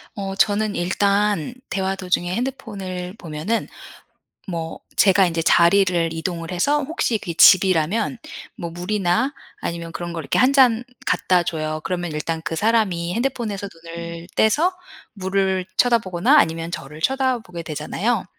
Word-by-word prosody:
어 195 -2 -4
저는 205 +1 +1
일단 200 +2 +1 0.2
대화 190 0 -1
도중에 180 -1 -1
핸드폰을 200 -8 -4
보면은 170 +6 -3 0.8
뭐 165 -2 -4 0.2
제가 195 -1 +5
인제 165 -1 -1
자리를 175 0 +4
이동을 165 0 -4
해서 285 +12 +1
혹시 270 -6 -1
그게 170 - -5
집이라면 185 - +4 0.4
뭐 170 - -5
물이나 180 +7 0 0.3
아니면 170 -1 -4
그런 175 0 -5
걸 165 -2 -4
이렇게 - - 0
1 255 +2 +5
잔 250 -4 +4 0.2
갖다 180 0 +2
줘요. 155 -2 -3
그러면 175 -3 -2
일단 160 +2 -3
그 155 +2 -3
사람이 200 -6 +1
핸드폰에서 225 -4 -2 0.2
눈을 170 0 -7
떼서 310 - +3 0.4
물을 190 -1 0
쳐다 240 -1 +4
보거나 190 +7 +2
아니면 165 - +2
저를 150 0 -7
쳐다 260 +6 +1
보게 175 -6 -8
되잖아요. 185 +9 -2
185 Hz, 305 characters per minute, -22 LUFS, 170-220 Hz, 0.8 s, 제가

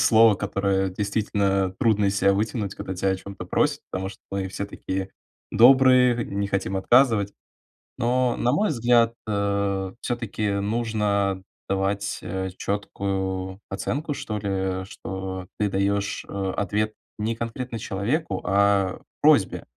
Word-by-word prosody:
слово, 110 -1 +6
которое 100 -1 0
действительно 100 -1 0
трудно 105 -3 +3
из 100 0 +1
себя 100 0 +4
вытянуть, 105 -1 -1
когда 95 - -5
тя 95 +2 0
о 95 - +2
чём-то 100 0 -8
просят, - - +1
потому 95 +1 -3
что 95 - -11
мы 95 -1 -2
все 95 +1 -4
такие 95 -1 -4 0.4
добрые, 125 0 +6
не 100 +1 -2
хотим 95 -1 -1
отказывать, 105 0 +4 0.6
но 125 +1 +1
на 120 - +1
мой 205 +9 +2
взгляд, 120 -2 +3
э, 100 -2 0
всё-таки 115 -4 -2
нужно 100 -2 0 0.3
давать, 95 +1 -1
э, 95 +1 -3
четкую 95 -2 -3
оценку, 145 +10 -2
что 105 -5 -4
ли, 95 -2 -2
что 95 -1 -6
ты 105 - +2
даешь, 100 +1 0
э, 95 -1 -2
ответ 105 +2 0 0.3
не 110 +2 -1
конкретно 115 +1 -4
человеку, 100 - -2
а 100 0 +2 0.2
просьбе. - - +4
100 Hz, 135 wpm, -24 LUFS, 95-110 Hz, 0.6 s, слово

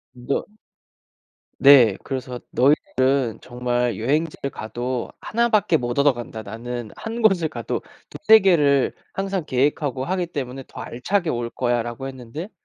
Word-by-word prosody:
너 125 +3 -2 1.1
네 130 -8 +7
그래서 130 -2 -5
"너희들은 130 -3 +2
정말 120 -2 -1
여행지를 145 - -1
가도 120 +2 -4
1 235 +1 +1
밖에 210 -7 +3
못 120 -2 -3
얻어간다. 120 -6 0
나는 115 +2 -6
1 225 +1 -5
곳을 195 -7 +4
가도 155 - -4 0.3
2-3 220 -6 +6
개를 150 -9 +3 0.2
항상 195 -3 -2
계획하고 135 0 0
하기 180 +3 -1
때문에 135 -4 -5
더 - - -9
알차게 175 +9 -1
올거야." 120 0 -1
라고 120 +3 -6
했는데 135 - -7
135 Hz, 260 characters per minute, -22 LUFS, 120-160 Hz, 1.1 s, 네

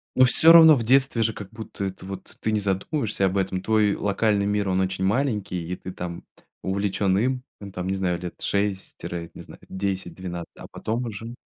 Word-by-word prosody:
Ну, 130 - +7
всё 160 +6 +6
равно 160 -2 +9
в 120 - -2
детстве 130 -1 +3
же 110 - +1
как 100 -3 -9
будто 110 -3 -6
это 95 -1 -6
вот 95 0 -8
ты 110 - 0
не 110 - +1
задумываешься 100 +2 -1
об 95 +1 0
этом. 95 -1 -1
Твой 105 -1 +2
локальный 100 0 +1
мир, 105 0 0
он 95 0 +1
очень 95 0 -1
маленький 105 -6 -1
и 90 - -2
ты 95 - -8
там 85 -1 -6 0.4
увлечён 95 0 0
им. 125 +4 0 0.2
Ну 100 -1 -8
там 90 -1 -5
не 95 - 0
знаю, 90 -2 -1
лет 90 -1 -6
6 100 -1 -2
тире, 85 -1 -6
не - - -10
знаю, - - -13
10-12, 95 -2 -4
а - - -10
потом 115 +3 -3
уже 115 +1 -6
100 Hz, 205 wpm, -24 LUFS, 95-110 Hz, 0.4 s, равно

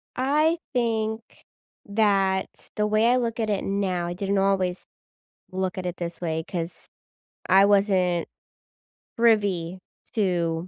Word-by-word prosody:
I 300 +6 +2 0.2
think 225 -2 0 0.6
that 200 -2 +2 0.3
the 210 - +1
way 215 +2 +3
I 255 - +4
look 235 -1 -2
at 220 - 0
it 205 -2 0
now, 190 -3 -1
I 175 - -3
didn't 195 +1 -1
always 190 -2 +1 0.7
look 185 0 -2
at 180 - -4
it 180 - -3
this 170 0 -6
way 160 -2 -2
'cause 170 -1 -5 0.6
I 195 +1 +6
wasn't 195 -4 +2 0.9
privy 200 -6 +2 0.3
to 175 -5 0
195 Hz, 130 wpm, -25 LUFS, 180-220 Hz, 0.9 s, I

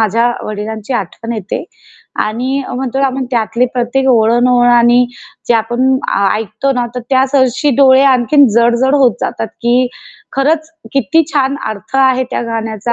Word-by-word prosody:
माझ्या 230 +3 +1
वडिलांची 215 +2 -5
आठवण 230 +3 -4
येते 215 -3 -5 0.6
आणि 255 +6 -2
म्हणतो 260 +1 -3
ना 275 - +3
आपण 265 0 -3
त्यातले 235 +1 0
प्रत्येक 250 +2 -1
ओळ 225 -2 +3
अन 240 +1 +2
ओळ. 245 -1 +3
आणि 240 +1 +4 0.4
जे 240 - +4
आपण 240 +4 +1
आ 200 0 +1
ऐकतो 220 +5 -2
ना 245 -2 -1
तर 250 - -3
त्यासरशी 265 +1 +2
डोळे 265 -1 +5
आणखीन 270 +2 +4
जड-जड 240 +4 +2
होत 265 -4 +4
जातात 225 - -3
की 245 +2 +2 0.5
खरंच 315 +4 0 0.2
किती 320 +4 +2
छान 275 -1 +1
अर्थ 215 +3 -7
आहे 260 -1 +3
त्या - - -2
गाण्याचा 225 0 -3
245 Hz, 160 wpm, -13 LUFS, 225-265 Hz, 0.6 s, डोळे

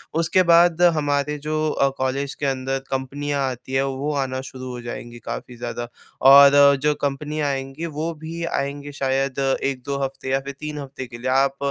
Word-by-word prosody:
उसके 165 +3 +3
बाद 170 0 +5
हमारे 145 0 0
जो 155 0 0
अ, 140 -2 +2
कॉलेज 135 +2 -1
के 145 - -4
अंदर 135 0 -1
कंपनियाँ 135 +1 -2
आती 130 +1 -8
हैं, 135 0 +2
वो 135 +2 -2
आना 130 0 -4
शुरू 130 -1 -8
हो 125 -1 -6
जाएँगी 120 0 -7
काफ़ी 125 - -6
ज़्यादा 120 0 -5 0.4
और 140 +1 +8
जो 150 +1 +3
कंपनियाँ 145 +2 -2
आएँगी, 135 +3 -4
वो 160 +1 -3
भी 160 +2 -7
आएँगे 140 -1 -3
शायद 135 -1 -1 0.2
1-2 140 0 -2
हफ़्ते 135 0 -5
या 135 +1 +2
फिर 140 +1 -7
3 150 0 -5
हफ़्ते 135 -2 -7
के 120 -1 -10
लिए। 125 +2 -3
आप 135 +1 +2
140 Hz, 180 wpm, -22 LUFS, 130-150 Hz, 0.4 s, और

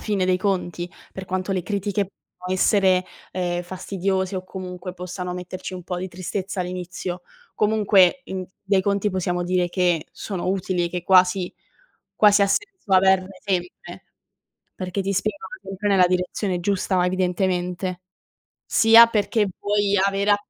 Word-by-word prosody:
fine 205 -4 0
dei 185 0 +2
conti, 180 -2 -2 0.2
per 190 - -7
quanto 185 +1 -2
le 185 -2 -1
critiche 205 +1 -1 0.3
può 180 0 -5
essere, 185 -1 +3 0.3
ehm, 175 -1 -2
fastidiose 190 +1 -2
o 185 - -4
comunque 180 -1 -7
possano 180 0 -5
metterci 180 +1 -6
un 180 -1 -8
po' 180 - -4
di 185 +1 -4
tristezza 185 +2 -4
all'inizio, 180 0 -5 0.3
comunque 210 +1 +3
in 185 -1 -5 0.2
dai 195 -1 +2
conti 200 +1 0
possiamo 180 -1 -1
dire 180 0 +1
che 175 -3 +1
sono 185 -4 -5
utili 185 -2 0
e - - -4
che 180 0 -4
quasi 185 0 +4 0.6
quasi 205 -1 +5
ha 200 - +4
senso 395 - -2
averne 190 0 +3
sempre. 180 -3 -4 0.7
Perché 185 +1 -3
ti 195 +1 -1
spingono 215 - -3
comunque 195 +2 -4
nella 190 -3 +5
direzione 180 +1 -1
giusta 185 -1 +1
evidentemente. 180 0 -1 0.7
Sia 225 +1 +7
perché 215 -1 +1
vuoi 205 0 +1
avere 195 +1 +2
a - - +5
185 Hz, 145 wpm, -23 LUFS, 180-200 Hz, 0.7 s, Sia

